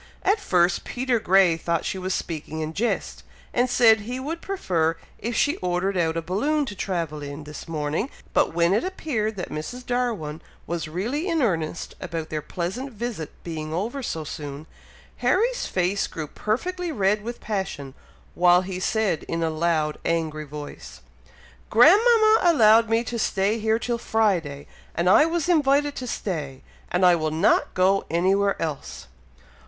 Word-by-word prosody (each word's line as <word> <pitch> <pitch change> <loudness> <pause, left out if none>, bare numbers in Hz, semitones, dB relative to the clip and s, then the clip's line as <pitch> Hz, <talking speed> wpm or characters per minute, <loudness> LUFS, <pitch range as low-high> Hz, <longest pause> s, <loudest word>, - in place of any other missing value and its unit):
At 400 +3 +3
first 180 - +2
Peter 250 -1 -1
Grey 190 -4 +4
thought 170 0 -1
she 190 - -2
was 185 0 -2
speaking 160 -1 -4
in 155 +1 -4
jest, 235 +7 -2 0.3
and 250 +1 +2
said 225 -2 +5
he 245 +5 -5
would 320 +6 -4
prefer 170 - 0 0.2
if 235 +2 -3
she 290 - +2
ordered 180 +2 -1
out 165 -2 +1
a 165 - -2
balloon 285 - 0
to 205 - -7
travel 165 -6 -3
in, 145 +1 -7
this 150 0 -9
morning; 155 - -2 0.2
but - - +3
when 170 +2 +2
it 215 - +2
appeared 270 - -2
that 180 - -5
Mrs. 245 +12 -6
Darwin 230 -12 -2 0.2
was 170 -2 -3
really 235 - -2
in 325 -4 +1
earnest 165 -6 -1
about 165 -3 -4
their 155 -1 -2
pleasant 190 - -4
visit 220 -8 -5
being 155 -2 -5
over 230 +10 -2
so 165 -10 -3
soon, 145 0 -7 0.5
Harry's 485 +5 +1
face 185 +2 0
grew 160 - -5
perfectly 345 - -2
red 210 -4 +1
with 235 +2 -6
passion, 190 -10 -4 0.4
while 180 +1 +5
he 185 -1 -5
said 200 -4 0
in 165 0 -2
a 160 - 0
loud 155 -1 0
angry 160 -2 -1
voice, 145 0 -9 0.7
"Grandmama 435 - +6
allowed 230 -9 +5
me 225 +1 +2
to 235 0 -4
stay 210 +1 +1
here 220 +1 +2
till 235 0 -2
Friday! 180 -12 0 0.3
and 170 +2 0
I 190 +11 +7
was 335 -1 -1
invited 290 -3 +3
to 255 - -5
stay, 150 - -4 0.3
and 180 +1 +3
I 180 -1 +7
will 155 -2 -1
not 160 +5 +2
go 190 +2 +3
anywhere 195 +4 +2
else!" 155 -4 -5
190 Hz, 165 wpm, -24 LUFS, 165-240 Hz, 0.7 s, I